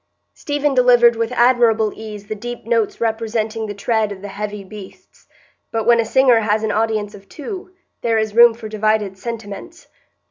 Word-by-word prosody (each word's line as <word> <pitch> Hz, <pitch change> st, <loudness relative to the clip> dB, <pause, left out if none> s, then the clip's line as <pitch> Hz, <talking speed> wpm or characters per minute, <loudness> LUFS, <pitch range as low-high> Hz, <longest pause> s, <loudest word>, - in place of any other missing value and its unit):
Stephen 290 Hz, -1 st, -1 dB
delivered 245 Hz, -2 st, +5 dB
with 230 Hz, +1 st, -2 dB
admirable 235 Hz, -3 st, +3 dB
ease 215 Hz, -2 st, -9 dB
the 210 Hz, -, -5 dB
deep 240 Hz, +2 st, -7 dB
notes 230 Hz, -2 st, 0 dB
representing 225 Hz, -1 st, -2 dB
the 205 Hz, -, -5 dB
tread 220 Hz, 0 st, 0 dB
of 195 Hz, -1 st, -9 dB
the 205 Hz, -, -6 dB
heavy 205 Hz, +1 st, -6 dB
beasts; 195 Hz, 0 st, -13 dB, 0.4 s
but 225 Hz, -1 st, -2 dB
when 235 Hz, 0 st, +5 dB
a 230 Hz, -, +2 dB
singer 255 Hz, 0 st, +4 dB
has 215 Hz, 0 st, 0 dB
an 220 Hz, -, 0 dB
audience 215 Hz, -1 st, -1 dB
of 195 Hz, -1 st, -15 dB
two, 365 Hz, +4 st, -8 dB, 0.3 s
there 230 Hz, -2 st, +1 dB
is 220 Hz, -1 st, -1 dB
room 235 Hz, 0 st, +7 dB
for 225 Hz, -1 st, -8 dB
divided 215 Hz, -2 st, 0 dB
sentiments. 225 Hz, -, -8 dB
225 Hz, 175 wpm, -19 LUFS, 210-235 Hz, 0.4 s, room